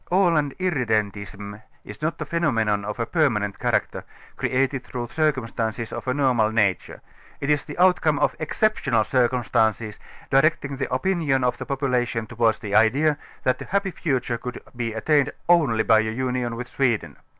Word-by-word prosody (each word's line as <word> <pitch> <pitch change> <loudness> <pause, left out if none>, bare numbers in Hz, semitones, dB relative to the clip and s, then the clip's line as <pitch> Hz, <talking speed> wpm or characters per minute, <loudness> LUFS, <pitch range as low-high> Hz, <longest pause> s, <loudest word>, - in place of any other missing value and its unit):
Aland 165 -7 +2
Irredentism 105 - -2 0.2
is 105 +4 -10
not 155 +2 -2
a - - -3
phenomenon 110 -12 0
of 105 +3 -5
a 115 - 0
permanent 115 - 0
character, - - -1 0.3
created 135 0 0
through 120 -2 -6
circumstances 115 -7 -1
of - - -6
a 130 - +1
normal 125 -6 +2
nature; 100 -6 0 0.4
it 140 +1 0
is 150 - +1
the 150 - -8
outcome 180 -4 +3
of - - +1
exceptional 155 - +1
circumstances, 115 -3 0 0.3
directing 140 0 +2
the 135 - -3
opinion 160 -9 +1
of 125 - 0
the - - -6
population 125 -4 -1
towards 115 -1 +1
the 100 -1 -6
idea, 135 +9 +4 0.3
that 130 0 +1
a - - -5
happy 200 0 -1
future 130 -8 -2
could 125 +1 -6 0.2
be 120 -1 -2
attained 140 +6 +1 0.2
only 145 -11 +4
by 110 -1 +5
a 110 0 0
union 125 0 -2
with 120 +1 -6
Sweden. 115 - -1
125 Hz, 160 wpm, -23 LUFS, 110-145 Hz, 0.4 s, by